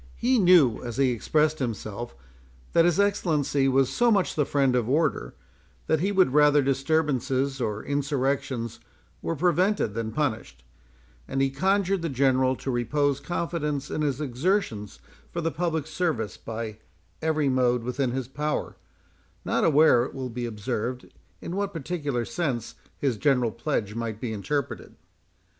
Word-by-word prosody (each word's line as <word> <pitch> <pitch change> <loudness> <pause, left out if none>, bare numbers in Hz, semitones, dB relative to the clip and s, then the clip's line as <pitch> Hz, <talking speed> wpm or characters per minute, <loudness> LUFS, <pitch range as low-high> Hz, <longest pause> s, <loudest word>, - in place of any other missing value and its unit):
He 250 +1 +2
knew 175 - +5
(as 120 -2 -6
he 135 -2 +3
expressed 155 +6 +1
himself) 120 -2 -4 0.6
that 165 - +5
his 175 +1 +2
Excellency 155 -9 +1
was 135 0 +2
so 240 0 +3
much 200 -5 +2
the 150 -3 0
friend 135 -3 +2
of 120 -2 0
order, 140 - 0 0.5
that 160 - +2
he 195 +5 0
would 185 -9 +3
rather 150 -1 +5
disturbances 135 -1 0
or 110 -2 -2
insurrections 140 -4 -1 0.4
were 165 - -2
prevented 180 - +1
than 110 0 -3
punished; 110 - -3 0.6
and 135 - -2
he 135 0 +2
conjured 190 +5 +1
the 165 - -2
General 130 -1 +2
to 135 - -4
repose 140 +3 0
confidence 150 -2 -3
in - - -2
his 140 -3 0
exertions 130 - -1 0.3
for 170 - -3
the 165 -1 -1
public 160 -3 -1
service 155 - -2
by 110 -1 -6 0.4
every 155 -2 +1
mode 125 -2 +2
within 125 +2 -1
his 130 0 -3
power; 150 +3 -3 0.7
not - - +1
aware, 150 -5 +5
it - - -9
will 130 -1 -4
be 120 +1 -3
observed, 115 +3 -4 0.3
in 175 - -5
what 200 0 -2
peculiar 145 -6 -2
sense 130 -9 -3 0.2
his 130 -6 0
general 125 -3 +2
pledge 105 -6 -2
might 115 -2 -4
be 115 -2 -3
interpreted. 140 +6 -3
140 Hz, 150 wpm, -26 LUFS, 120-160 Hz, 0.7 s, knew